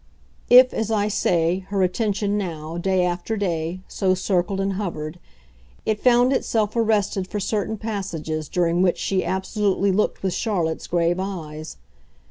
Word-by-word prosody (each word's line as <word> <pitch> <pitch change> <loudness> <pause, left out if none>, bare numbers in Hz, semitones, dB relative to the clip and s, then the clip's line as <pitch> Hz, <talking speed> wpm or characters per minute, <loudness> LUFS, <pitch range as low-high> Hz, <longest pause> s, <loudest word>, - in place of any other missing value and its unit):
If, 250 +1 +8
as 220 -1 -2
I 210 -1 +1
say, 175 -3 +1
her 195 -1 +1
attention 205 +1 0
now, 165 -4 -4
day 185 0 +2
after 180 +5 -2
day, 175 -2 -2
so 185 -1 +1
circled 185 0 0
and 195 0 0
hovered, 175 -4 -4 0.7
it 215 -1 0
found 250 +1 +4
itself 220 -5 0
arrested 210 -4 +1
for 210 - -3
certain 210 +2 -1
passages 170 -8 -4
during 175 0 +1
which 185 -2 +3
she 190 -1 0
absolutely 195 +2 0
looked 205 +1 0
with 190 -2 0
Charlotte's 175 -8 -1
grave 175 +1 +1
eyes. 160 -5 -6
190 Hz, 145 wpm, -23 LUFS, 175-210 Hz, 0.7 s, If